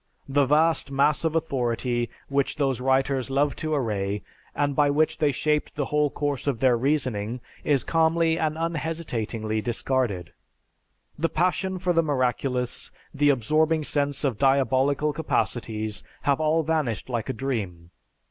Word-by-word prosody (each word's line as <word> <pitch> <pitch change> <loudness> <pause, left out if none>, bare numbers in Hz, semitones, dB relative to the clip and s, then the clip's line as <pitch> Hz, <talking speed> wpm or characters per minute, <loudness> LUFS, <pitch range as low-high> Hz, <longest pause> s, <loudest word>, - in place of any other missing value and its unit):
The 140 0 +2
vast 155 +1 +3
mass 140 +3 +2
of 160 -1 0
authority 120 -5 -1 0.2
which 140 -1 0
those 135 -4 0
writers 135 0 +1
loved 140 +1 +1
to 155 -1 -1
array, 105 -6 -1 0.3
and 145 -1 0
by 145 0 +4
which 155 +2 +1
they 150 -3 +3
shaped 150 +2 -1
the 145 -2 -1
whole 150 0 +1
course 145 -1 -3
of 135 -5 0
their 130 -2 +4
reasoning, 125 -4 -1 0.2
is 140 -4 +2
calmly 165 0 +2
and 155 0 0
unhesitatingly 150 -10 -2
discarded. 120 -6 -1 0.9
The 165 +2 +1
passion 185 +3 0
for 180 0 0
the 165 - +4
miraculous, 130 -3 -1 0.2
the 145 0 +3
absorbing 155 +5 +2
sense 145 -1 0
of 130 -7 0
diabolical 135 +2 +2
capacities, 110 -8 -2 0.2
have 140 0 +2
all 160 +1 +2
vanished 155 -7 -1
like 120 -4 -3
a - - 0
dream. 100 -10 -4
140 Hz, 145 wpm, -25 LUFS, 125-155 Hz, 0.9 s, by